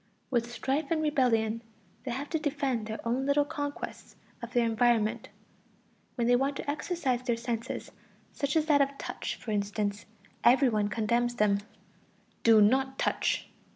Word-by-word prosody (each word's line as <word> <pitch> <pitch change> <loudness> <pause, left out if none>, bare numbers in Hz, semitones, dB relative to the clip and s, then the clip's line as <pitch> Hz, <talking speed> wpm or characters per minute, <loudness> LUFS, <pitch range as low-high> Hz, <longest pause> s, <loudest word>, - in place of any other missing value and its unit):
With 240 -1 0
strife 275 +4 -1
and 330 - +1
rebellion 230 -6 +2 0.4
they - - -3
have 270 +4 -3
to 320 - +1
defend 275 -7 -1
their 220 0 -4
own 260 +4 0
little 285 +1 +3
conquests 290 -2 -6 0.3
of 235 0 -7
their 240 -2 +2
environment. 230 0 +1 0.9
When 235 - 0
they 245 +1 +5
want 275 +3 +1
to - - -6
exercise 285 -4 -1
their 240 -2 -1
senses, 235 +1 -4 0.4
such 280 +1 -2
as 315 -1 +3
that 295 -3 +4
of 275 0 0
touch, - - -4
for 225 - -7
instance, 205 0 -2 0.4
every 260 +2 +6
one 210 -2 +1
condemns 235 +3 0
them: 210 -3 +3 0.8
"Do 225 -2 +6
not 265 +4 +2
touch!" - - 0
245 Hz, 155 wpm, -29 LUFS, 225-280 Hz, 0.9 s, every